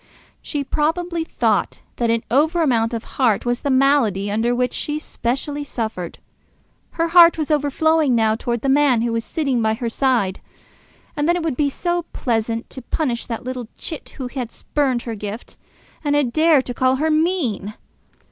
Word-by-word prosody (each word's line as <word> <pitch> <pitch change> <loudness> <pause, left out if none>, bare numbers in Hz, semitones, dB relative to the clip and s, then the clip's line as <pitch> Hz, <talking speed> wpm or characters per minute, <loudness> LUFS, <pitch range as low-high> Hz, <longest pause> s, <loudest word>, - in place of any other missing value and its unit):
She 290 -2 -3
probably 330 +4 -1
thought - - 0 0.2
that 235 -1 0
an 230 0 +1
over 315 +6 +3
amount 230 -5 +2
of 230 -1 -4
heart 240 -6 0
was 245 0 0
the 285 - -2
malady 260 -8 +2
under 230 +3 +1
which 250 0 0
she 300 0 -2
specially 285 +1 -3
suffered. 220 -10 -4 0.8
Her 330 0 0
heart 340 -1 +7
was 310 -1 -2
overflowing 300 -1 +2
now 220 -1 +3
towards 235 +1 -3
the - - 0
man 270 -4 +4
who 235 -1 -1
was 230 0 -1
sitting 275 -5 -1
by 220 0 +1
her 235 0 -3
side. 230 -7 +1 0.8
And 295 +1 0
then 345 - +4
it 350 - -2
would 320 -5 -1
be 285 +2 +1
so 345 +4 -2
pleasant 230 -1 -1
to 260 - -7
punish 245 -1 -2
that 230 -2 -4
little 250 -2 -5
chit 315 - -6
who 260 - -4
had 245 -3 -5
spurned 265 -5 -1
her 230 - -4
gift 210 +2 -7 0.5
and 290 -1 +1
had 270 -5 +1
dared 310 -4 +4
to 245 - -4
call 255 +1 +2
her 310 +4 0
mean! 305 - 0
260 Hz, 180 wpm, -21 LUFS, 230-300 Hz, 0.8 s, heart